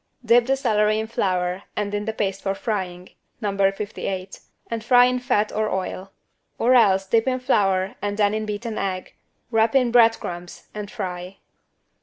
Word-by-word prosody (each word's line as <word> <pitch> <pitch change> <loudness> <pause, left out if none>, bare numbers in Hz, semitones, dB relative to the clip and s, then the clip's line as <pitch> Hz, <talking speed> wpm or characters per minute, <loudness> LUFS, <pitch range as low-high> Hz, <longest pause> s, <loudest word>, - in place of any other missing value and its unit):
Dip 235 +1 +5
the 270 - +3
celery 215 -5 +2
in 220 - -1
flour 185 -4 -1
and 205 -1 -2
in 205 0 -2
the 220 - -1
paste 195 -3 -2
for 195 0 -1
frying 185 -4 -4 0.3
(No. 205 -2 -2 0.2
58) 195 -2 -5 0.3
and 230 -1 -3
fry 245 +1 +6
in 250 0 +1
fat 215 -4 0
or 215 0 -1
oil. 190 0 -4 0.5
Or 245 +3 +3
else 195 -6 +4
dip 225 +5 +2
in 255 0 +1
flour 195 -6 +1
and 205 0 -2
then 205 -1 +2
in 215 0 -2
beaten 215 +2 -4
egg, 185 -2 -3 0.4
wrap 225 +2 +2
in 250 -3 +3
bread 230 -1 +5
crumbs 175 0 -8
and 210 -1 -6
fry. 185 -4 -6
210 Hz, 175 wpm, -23 LUFS, 195-230 Hz, 0.5 s, fry